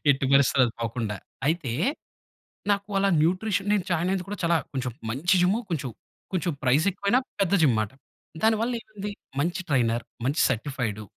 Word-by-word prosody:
ఎట్టి 135 0 +2
పరిస్థతి‌లో 135 -1 +5
అది 115 - -4
పోకుండా. 115 -2 -2 0.3
అయితే 155 -6 0 1.0
నాకు 200 0 +2
వాళ్ళ 195 0 +3
న్యూట్రిషన్ 195 +4 +1
నేను 205 -4 +2
జాయిన్ 175 +1 +1
అయ్యింది 190 -2 -1
కూడా 205 - -4
చాలా 170 0 +3 0.2
కొంచెం 130 -2 -2 0.2
మంచి 170 +10 +2
జిమ్ 190 +4 +3
కొంచెం, 135 -6 -2 0.4
కొంచెం 175 -2 0
ప్రైజ్ 135 +6 +3
ఎక్కువైనా 200 +7 +1 0.2
పెద్ద 195 -1 +2
జిమ్‌ 130 -7 +5
మాట. 110 - -2 0.5
దానివల్ల 225 +2 +2
ఏమైంది? 210 -1 -7 0.3
మంచి 175 +4 0
ట్రైనర్, 120 -4 +1 0.2
మంచి 145 +4 +1
సర్టిఫైడు. 115 -4 -2
160 Hz, 155 wpm, -26 LUFS, 130-195 Hz, 1.0 s, పరిస్థతి‌లో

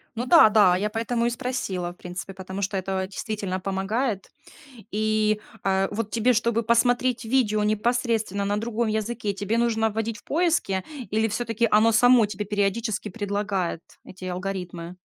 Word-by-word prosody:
Ну 235 +2 -2
да, 315 -7 +8
да, 205 -4 +5
я 210 +3 -1
поэтому 230 +1 -1
и - - +3
спросила, 230 -8 -3
в 175 - -17
принципе, 180 +2 -7
потому 190 +1 -6
что 195 0 -1
это 190 0 -2
действительно 200 -2 -4
помогает. 195 +3 -2 0.6
И, 215 0 +1 0.2
э, 195 0 +2
вот 215 0 -3
тебе, 240 +2 +3
чтобы 230 0 +1
посмотреть 245 +2 +2
видео 220 -3 +1
непосредственно 215 -1 0
на 205 +1 0
другом 230 +1 -1
языке, 215 -1 -2
тебе 205 +3 -2
нужно 225 -1 +2
вводить 220 +1 -3
в - - -17
поиске 310 - +1 0.3
или 220 +1 +2
всё-таки 230 +1 0
оно 220 +2 +5
само 245 0 +6
тебе 205 0 -4
периодически 210 +2 -1
предлагает, 200 -4 -2 0.2
эти 185 0 -11
алгоритмы? 180 -1 -5
215 Hz, 155 wpm, -25 LUFS, 195-230 Hz, 0.6 s, да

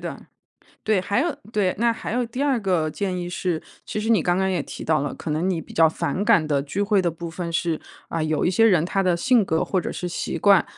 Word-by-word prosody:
的。 - - -7 0.6
对， 215 -3 +2
还 200 +6 0
有 330 -1 -1 0.2
对， 200 -4 +1
那 235 +1 +3
还 225 - -6
有 245 0 +1
第 250 +4 -4
二 275 -4 +2
个 180 -5 +1
建 190 +3 -2
议 175 -1 -4
是， 175 -2 -2 0.2
其 215 - -4
实 220 - -3
你 215 -6 +5
刚 175 0 +1
刚 190 0 +1
也 180 -4 0
提 - - -8
到 155 -1 +2
了， 145 - -3
可 160 - -6
能 160 +5 0
你 170 -3 0
比 - - -12
较 165 -1 +5
反 160 +5 -2
感 165 -6 +4
的 145 -2 +1
聚 190 +8 -2
会 205 -1 +3
的 175 - +1
部 170 +1 -7
分 170 0 -5
是， 165 -1 -1 0.3
啊， 165 - -2
有 155 -1 0
一 - - +3
些 205 +5 +4
人 180 -7 +4
他 195 +2 0
的 180 -2 +2
性 235 +4 +3
格 160 -2 0
或 190 - 0
者 - - -4
是 180 - -4
习 170 - -3
惯， 200 0 +5
180 Hz, 285 characters per minute, -23 LUFS, 165-205 Hz, 0.6 s, 你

